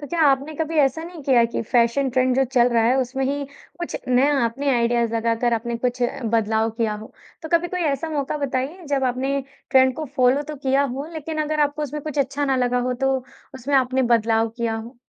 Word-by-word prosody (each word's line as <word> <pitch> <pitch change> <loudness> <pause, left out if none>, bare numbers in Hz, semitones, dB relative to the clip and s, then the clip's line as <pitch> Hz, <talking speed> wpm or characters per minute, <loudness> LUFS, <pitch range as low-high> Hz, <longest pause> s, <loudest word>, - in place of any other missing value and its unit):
तो 290 - -7
क्या 335 +3 -2
आपने 280 +2 +1
कभी 320 0 -2
ऐसा 270 +4 -1
नहीं 340 -2 -10
किया 255 -4 +4
कि - - -2
फैशन 235 +4 +2
ट्रेंड 255 0 +2
जो 270 - +4
चल 245 -1 +3
रहा 235 -2 +2
है 245 +3 +3
उसमें 265 +1 -2
ही, 280 +1 -1 0.3
कुछ 345 - -4
नया 270 +3 +3 0.4
आइडियाज़ 235 -1 +1
लगाकर 230 +1 0
आपने 235 +1 -3
कुछ 245 +1 -2 0.3
बदलाव 225 0 +1
किया 220 -2 0
हो। 215 +1 -10 0.3
तो 320 - -6
कभी 340 +1 +2
कोई 365 0 -3
ऐसा 320 +4 -3
मौका 290 -1 -2
बताइए 280 +5 -3
जब 270 -1 0
आपने 270 +2 -1 0.3
ट्रेंड 260 -1 +5
को 315 - -3
फ़ॉलो 255 +3 +3
तो 300 0 -7
किया 270 0 +1
हो, 275 +2 -3
लेकिन 310 0 -3
अगर 305 0 -1
आपको 290 +1 0
उसमें 295 +1 -4
कुछ 300 -1 -5
अच्छा 280 +1 0
ना 270 -2 +1
लगा 250 0 +1
हो 250 - +1
तो 270 0 +2 0.4
उसमें 265 +2 -3
आपने 260 0 +2
बदलाव 225 0 +2
किया 230 -2 -1
हो? 230 +3 -9
265 Hz, 215 wpm, -22 LUFS, 240-290 Hz, 0.4 s, ट्रेंड